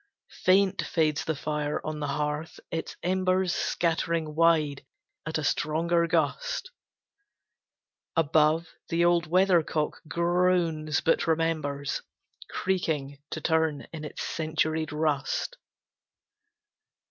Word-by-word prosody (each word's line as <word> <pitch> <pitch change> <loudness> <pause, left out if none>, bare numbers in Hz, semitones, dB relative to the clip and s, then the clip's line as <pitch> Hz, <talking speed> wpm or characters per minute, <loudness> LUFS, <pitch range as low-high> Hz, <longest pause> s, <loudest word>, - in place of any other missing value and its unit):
Faint 190 +1 +4
fades 155 -3 0
the 160 - -1
fire 150 0 -2
on 155 -1 -3
the 145 - -2
hearth, 150 +2 -3
its 165 - -4
embers 185 0 +1
Scattering 165 -2 0
wide 155 -3 +3 0.4
at 160 - -1
a 155 - -3
stronger 170 +3 +1
gust. - - -1 1.4
Above, 160 +1 +3 0.2
the 170 +1 +2
old 175 -1 +3
weathercock 170 -3 +2
groans, 170 -3 +1
but 165 - +2
remembers 155 -4 0 0.5
Creaking, 150 -7 -1
to 155 - -5
turn, 160 -2 +1
in 155 -2 -6
its 150 - -5
centuried 155 -1 -1
rust. 150 -3 -1
160 Hz, 100 wpm, -28 LUFS, 150-170 Hz, 1.4 s, Faint